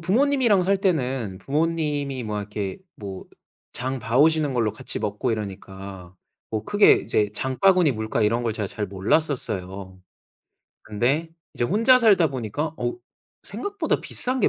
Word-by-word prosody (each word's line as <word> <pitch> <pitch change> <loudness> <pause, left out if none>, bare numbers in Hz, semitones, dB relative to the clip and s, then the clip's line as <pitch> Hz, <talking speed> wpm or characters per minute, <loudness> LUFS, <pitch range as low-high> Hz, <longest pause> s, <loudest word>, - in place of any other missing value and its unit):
부모님이랑 235 - +3
살 195 +2 +2
때는 130 - -1
부모님이 145 - -1
뭐 105 -1 -3
이렇게 100 -1 -4 0.2
뭐 100 -3 -7 0.5
장 130 +1 -2
봐 115 +3 0
오시는 155 -1 +4
걸로 115 -4 +1
같이 - - -3
먹고 105 +3 -2
이러니까 95 -3 -6 0.4
뭐 110 -1 -3
크게 205 - +6
이제 105 -1 0
장바구니 160 - +3
물가 110 0 -2
이런 115 +3 +2
걸 115 -2 0
제가 105 -2 -3
잘 105 +2 -3
몰랐었어요. 95 - -2 0.8
근데 130 +10 0 0.2
이제 - - -1
혼자 230 - +5
살다 200 -9 +5
보니까 135 +5 -3
어 355 - -1 0.5
생각보다 405 -5 -2
비싼 255 +1 -2
게 - - +4
130 Hz, 300 characters per minute, -24 LUFS, 105-165 Hz, 0.8 s, 크게